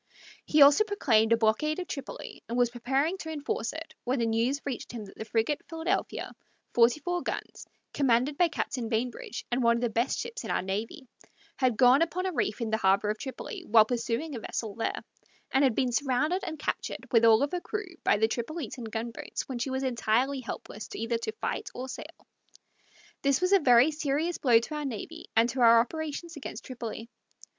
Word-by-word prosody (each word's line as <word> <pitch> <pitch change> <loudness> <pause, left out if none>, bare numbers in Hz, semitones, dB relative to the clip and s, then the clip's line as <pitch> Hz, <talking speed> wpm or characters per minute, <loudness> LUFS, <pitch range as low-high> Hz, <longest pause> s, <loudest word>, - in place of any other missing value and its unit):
He 300 -1 +6
also 285 +8 +7
proclaimed 240 - +2
a 230 - +6
blockade 230 +8 +1
of 365 -1 -4
Tripoli 275 -7 -7
and 235 - -2
was 245 -1 +3
preparing 270 +9 0
to 320 - -6
enforce 285 -6 -2
it 320 +1 -8
when 255 +2 0
the 235 - +1
news 230 +5 +1
reached 265 -4 -4
him 230 -3 -6
that 195 - -14
the 220 - -6
frigate 225 +6 0
Philadelphia, 325 0 -2 0.4
forty 240 +4 +4
four 355 +1 -2
guns, - - -5 0.3
commanded 270 +1 +2
by 350 +3 +4
Captain 250 -7 -3
Bainbridge, 240 +1 -3
and 245 +2 +1
one 235 -1 +4
of - - -4
the 240 -2 0
best 235 +4 0
ships 475 +1 -5
in - - -6
our - - 0
navy, 210 +7 -4 0.5
had 255 -4 +1
gone 255 +3 +6
upon 350 +2 0
a 375 - 0
reef 240 - -1
in 225 -1 -2
the 220 - +2
harbor 200 0 +3
of 215 - -6
Tripoli, 265 -2 -6
while 220 0 +7
pursuing 245 +5 -2
a 240 - -4
vessel 220 -1 -4
there, 230 - -3 0.5
and 270 - +3
had 260 -5 +3
been 255 -2 +1
surrounded 290 +8 +1
and 315 -1 -5
captured, 295 - -3
with 230 -3 +5
all 225 -1 +7
her 355 +4 -3
crew, 415 -3 -5
by - - +4
the 220 +2 +3
Tripolitan 245 0 -4
gunboats, 230 +1 -5
when 255 -3 -4
she 265 - -2
was 265 +1 -2
entirely 255 +2 +1
helpless 220 -3 -7
either 230 +1 -1
to 225 -1 -3
fight - - -3
or 255 +1 -5
sail. 260 - -10 1.0
This 275 -1 +2
was 365 +2 +2
a 395 - +7
very 250 0 +6
serious 305 +3 -1
blow 245 -4 +5
to 230 +7 -2
our 300 0 -3
navy 280 +7 -6
and 225 +1 +5
to 255 +1 -2
our 230 -1 +8
operations 315 +6 -3
against 285 - -7
Tripoli. 230 -3 -6
250 Hz, 200 wpm, -29 LUFS, 230-300 Hz, 1.0 s, our